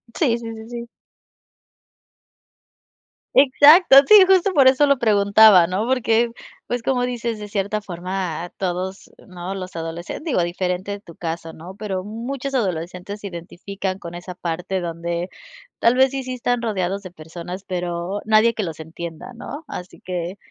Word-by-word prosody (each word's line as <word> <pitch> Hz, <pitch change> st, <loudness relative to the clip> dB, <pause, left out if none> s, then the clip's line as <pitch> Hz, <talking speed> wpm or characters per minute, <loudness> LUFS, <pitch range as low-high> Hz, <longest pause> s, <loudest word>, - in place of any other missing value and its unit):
Sí, 245 Hz, -8 st, +2 dB
sí, 230 Hz, -1 st, -7 dB
sí, 220 Hz, +1 st, -11 dB
sí. 235 Hz, -1 st, -6 dB, 2.5 s
Exacto, 285 Hz, +3 st, +7 dB
sí, 420 Hz, -2 st, +9 dB
justo 385 Hz, 0 st, +4 dB
por 275 Hz, -5 st, +6 dB
eso 265 Hz, +3 st, +5 dB
lo 280 Hz, -1 st, +4 dB
preguntaba, 205 Hz, -4 st, +6 dB
¿no? 185 Hz, +5 st, -1 dB
Porque, 235 Hz, -2 st, +2 dB, 0.4 s
pues, 245 Hz, 0 st, -2 dB
como 250 Hz, +1 st, 0 dB
dices, 235 Hz, -2 st, -3 dB
de 210 Hz, -, -7 dB
cierta 205 Hz, +1 st, -2 dB
forma 180 Hz, -2 st, -4 dB
todos, 185 Hz, +1 st, -4 dB, 0.2 s
¿no?, 180 Hz, 0 st, -6 dB
los 185 Hz, -2 st, -7 dB
adolescentes 165 Hz, -, -6 dB
digo, 300 Hz, -, 0 dB
diferente 180 Hz, +2 st, -2 dB
de 200 Hz, -, -5 dB
tu 170 Hz, -5 st, -14 dB
caso, 165 Hz, -1 st, -5 dB
¿no?, 175 Hz, +4 st, -11 dB
pero 195 Hz, -3 st, -4 dB
muchos 245 Hz, +6 st, -5 dB
adolescentes 180 Hz, -2 st, -3 dB
se 205 Hz, -, -6 dB
identifican 185 Hz, +2 st, -6 dB
con 170 Hz, -1 st, -8 dB
esa 175 Hz, +1 st, -8 dB
parte 180 Hz, +2 st, -3 dB
donde, 170 Hz, +1 st, -4 dB, 0.5 s
tal 235 Hz, +2 st, +4 dB
vez 260 Hz, 0 st, +4 dB
sí, 270 Hz, -1 st, -3 dB
sí 255 Hz, 0 st, -5 dB
están 245 Hz, -1 st, -1 dB
rodeados 200 Hz, -3 st, -2 dB
de 185 Hz, -, -9 dB
personas, 175 Hz, +3 st, -8 dB
pero 180 Hz, +1 st, -3 dB
nadie 220 Hz, +2 st, +4 dB
que 215 Hz, -, -3 dB
los 165 Hz, -4 st, -6 dB
entienda, 165 Hz, +7 st, -8 dB
¿no? 285 Hz, +6 st, -8 dB
Así 180 Hz, -7 st, -8 dB
que 180 Hz, +1 st, -4 dB
195 Hz, 160 wpm, -21 LUFS, 175-235 Hz, 2.5 s, sí